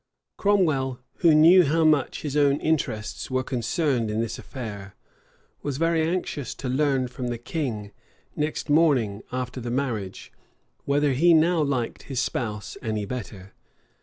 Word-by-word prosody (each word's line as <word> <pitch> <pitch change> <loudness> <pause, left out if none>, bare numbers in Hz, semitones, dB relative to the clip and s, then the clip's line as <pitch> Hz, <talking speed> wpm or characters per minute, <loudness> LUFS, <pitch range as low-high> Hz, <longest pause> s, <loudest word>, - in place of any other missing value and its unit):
Cromwell, 155 -11 +1 0.2
who 165 -3 +5
knew 170 +4 +7
how 160 +2 +2
much 150 -4 +2
his 145 -2 -3
own 145 -1 +3
interests 125 -9 -2
were 130 0 0
concerned 125 -1 -1
in 105 +1 -1
this 115 0 -3
affair, 105 -7 -8 0.7
was 140 -2 -3
very 165 +1 +2
anxious 160 -5 -2
to 135 - -6
learn 135 -1 +1
from 125 0 -5
the 120 -1 -2
king, 115 -5 -4 0.4
next 150 +2 -2
morning 140 -10 +3
after 125 0 -4
the 120 - -4
marriage, 120 -7 -3 0.5
whether 140 0 +2
he 165 +6 +5
now 165 +1 +3
liked 135 -5 -1
his 135 -3 -2
spouse 105 -4 -3
any 110 -2 -2
better. 100 -4 -7
135 Hz, 145 wpm, -25 LUFS, 115-155 Hz, 0.7 s, knew